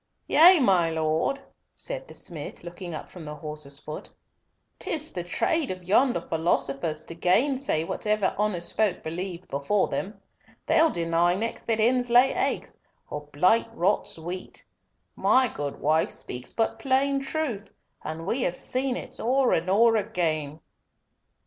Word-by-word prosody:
"Yea, 345 +3 +7
my 185 - +3
Lord," 160 - 0 0.4
said - - -5
the - - -12
smith, 160 -2 -7
looking 175 -1 -7
up - - -7
from 180 - -11
the 150 0 -7
horse's 150 -2 -6
foot; 155 0 -8 0.7
"'tis 310 -1 -2
the 175 - -4
trade 295 - 0
of 185 -1 -6
yonder 240 +2 +3
philosophers 155 -2 -1
to - - -7
gainsay 225 - +1
whatever 210 +3 0
honest 195 -5 -2
folk 215 -3 +1
believed 180 +2 -5
before 140 +9 0
them. 205 +3 -4 0.5
They'll 325 0 +4
deny 170 - +1
next 225 +4 -4
that 225 -1 +2
hens 245 +2 +2
lay 245 +3 +5
eggs, - - -2 0.3
or 150 0 -6
blight 180 +12 +3
rots 190 -1 0
wheat. 175 +3 -6 0.5
My 260 0 +4
good 145 - -5
wife 155 +2 +2
speaks 125 +1 -5
but 225 - -1
plain 275 +1 +2
truth, 270 -8 -3 0.3
and 160 +1 -5
we 235 +7 -1
have 175 -6 0
seen 255 +4 0
it - - -6
o'er 255 +2 +2
and 170 +3 0
o'er 225 +4 +5
again." 160 -7 -2
185 Hz, 150 wpm, -26 LUFS, 160-245 Hz, 0.7 s, Yea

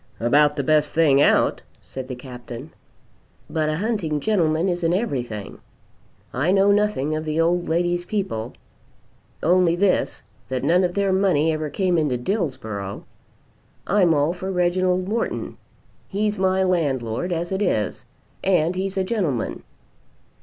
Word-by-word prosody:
"About 145 +5 +3
the 140 - -1
best 150 +1 +2
thing 145 -4 +4
out," - - +3 0.2
said 130 -1 -8
the 130 - -5
Captain. 125 +2 -9 0.8
"But 155 -1 0
a 155 - -1
hunting 190 -7 -1
gentleman 165 -2 +1
isn't 175 -2 0
everything. 120 - -3 0.7
I 145 +8 +1
know 195 +1 +4
nothing 200 -8 +1
of 155 - -3
the 155 0 -2
old 175 +1 +1
lady's 175 +1 +1
people, 175 - -3 0.9
only 175 0 +4
this 185 +1 +1 0.3
that 130 -1 -2
none 175 +6 +3
of 175 -1 -1
their 200 -1 +1
money 175 -5 +2
ever 155 -1 -3
came 180 +2 +1
into 145 -5 0
Dillsborough. 120 - -3 0.8
I'm 180 -4 +3
all 145 +3 +2
for 185 +1 -5
Reginald 180 0 +1
Morton. 225 +3 -3 0.5
He's 210 +1 -1
my 190 0 +2
landlord 145 -5 0
as 170 +1 -2
it 190 +1 -1
is, 110 - -1 0.4
and 180 -3 +2
he's 190 +1 -3
a 190 - +2
gentleman." 185 - -2
170 Hz, 140 wpm, -23 LUFS, 145-190 Hz, 0.9 s, thing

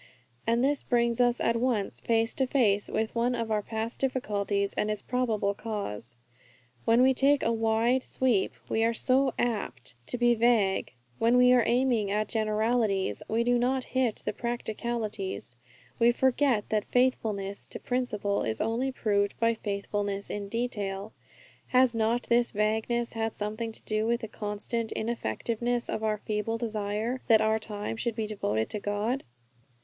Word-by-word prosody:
And 235 +2 +2
this 285 +1 +2
brings 235 -1 +1
us 245 0 +3
at 230 0 +1
once 230 -5 0
face 225 0 +1
to 265 - 0
face 210 -7 +2
with 220 0 -1
one 245 +1 +1
of 230 -2 -3
our 210 -1 +2
past 225 +2 -4
difficulties, 205 -6 -1
and 210 - -1
its 210 -1 -2
probable 225 -5 0
cause. 200 - -5 0.7
When 230 +2 +5
we 265 +1 +5
take 280 +2 +3
a 230 - +2
wide 225 +3 +2
sweep, 250 -6 +1
we 225 - +1
are 230 0 +2
so 265 +2 +2
apt 205 - -2
to - - -2
be 240 0 +4
vague. 225 - +2 0.3
When 235 +2 +4
we 250 0 +6
are 250 - +6
aiming 240 -4 +2
at 210 +1 0
generalities 215 - 0
we 225 +2 +2
do 245 0 +2
not 255 +2 +1
hit 255 -4 0
the - - -1
practicalities. 220 - -4 0.4
We 235 0 +6
forget 260 -2 +2
that 215 -1 0
faithfulness 215 -6 0
to - - -8
principle 210 -5 -1
is 110 -1 -2
only 245 +4 0
proved 205 -5 0
by 230 0 +3
faithfulness 200 -1 -3
in 200 -1 -4
detail. 205 -3 -3 0.5
Has 255 -1 +4
not 230 +2 +1
this 235 0 +2
vagueness 220 +3 0
had 225 -1 -2
something 215 +2 -3
to - - -13
do 215 +1 -1
with 235 +1 +1
the 225 - -4
constant 215 +2 -3
ineffectiveness 235 - -2
of - - -2
our 215 -1 +1
feeble 210 +2 -2
desire 220 +2 -2
that 225 -3 +6
our 220 0 +2
time 210 0 -5
should 235 -1 -2
be 220 -1 -1
devoted 110 - -1
to 210 - -3
God? 205 +6 -1
225 Hz, 165 wpm, -28 LUFS, 210-240 Hz, 0.7 s, we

